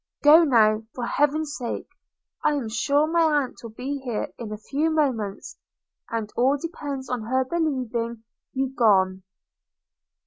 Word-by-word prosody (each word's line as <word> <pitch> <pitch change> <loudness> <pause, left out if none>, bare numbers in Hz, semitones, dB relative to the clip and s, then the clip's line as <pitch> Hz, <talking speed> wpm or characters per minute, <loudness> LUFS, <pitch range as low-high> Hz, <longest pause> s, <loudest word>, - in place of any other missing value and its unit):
Go, 310 +3 +8
now, 220 -7 +4
for 245 - -3
heaven's 295 +3 0
sake! 240 -3 -4 0.3
– - - -46
I 300 - +3
am 255 -6 -3
sure 280 +6 +2
my 335 +2 +1 0.2
aunt 255 - -9
will 230 - -8
be 265 +6 -4
here 245 -5 -3
in 225 -3 -6
a 215 - -4
few 285 +9 -1
moments: 255 -11 -1 0.5
and 225 -2 -4
all 265 +4 +3
depends 285 -4 -5
upon 240 -3 -3
her 260 +3 +1
believing 250 -7 -2 0.3
you 265 0 -1
gone.' 190 -6 +3
255 Hz, 150 wpm, -24 LUFS, 225-290 Hz, 0.5 s, Go